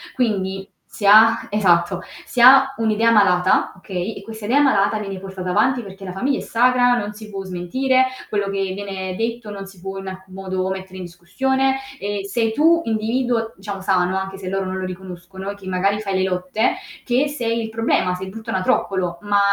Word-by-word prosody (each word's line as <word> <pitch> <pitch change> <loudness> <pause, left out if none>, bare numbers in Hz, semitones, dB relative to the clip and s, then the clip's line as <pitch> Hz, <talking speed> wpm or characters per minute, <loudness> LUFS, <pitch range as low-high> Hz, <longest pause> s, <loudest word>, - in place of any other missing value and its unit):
Quindi 195 -5 -1 0.2
si 205 - -6
ha 220 +3 +7
esatto, 185 -3 +2 0.2
si 245 - -4
ha 270 +2 +8
un'idea 225 +1 +2
malata, 185 -5 +3
okay, 185 +2 -4
e 195 - -10
questa 220 -1 -8
idea 270 +6 +3
malata 215 -5 +3
viene 195 -2 -5
portata 190 -1 -6
avanti 255 +6 +2
perché 195 -1 -10
la 180 - -6
famiglia 265 +8 0
è - - -4
sacra, 245 +1 +3
non 210 -1 -3
si 215 0 -11
può 195 -1 -5
smentire, 255 +9 +1 0.2
quello 205 -1 0
che 195 -1 -2
viene 190 -2 -5
detto 230 -1 -3
non 195 -1 -7
si 190 -3 -15
può 195 0 -6
in 195 - -8
alcun 190 0 -9
modo 190 -1 -3
mettere 190 0 -6
in 185 - -6
discussione, 265 +10 0 0.2
e 205 0 -3
sei 220 +2 0
tu 335 +4 +4
individuo, 225 +1 0
diciamo 195 0 -6
sano 190 -1 +1
anche 195 0 -4
se 190 -1 -8
loro 195 +1 -1
non 185 0 -3
lo 185 - -3
riconoscono 185 +1 -8
e 200 - -5
che 195 -2 -12
magari 195 +3 +1
fai 195 -3 -3
le 190 - +1
lotte, 185 +5 0 0.3
che 255 +4 +1
sei 235 -5 -2
il 220 - -5
problema, 220 -5 +1
sei 190 +1 -6
il - - -8
brutto 225 +1 -9
anatroccolo, 185 -1 0
ma 205 0 +2
200 Hz, 200 wpm, -21 LUFS, 190-225 Hz, 0.3 s, ha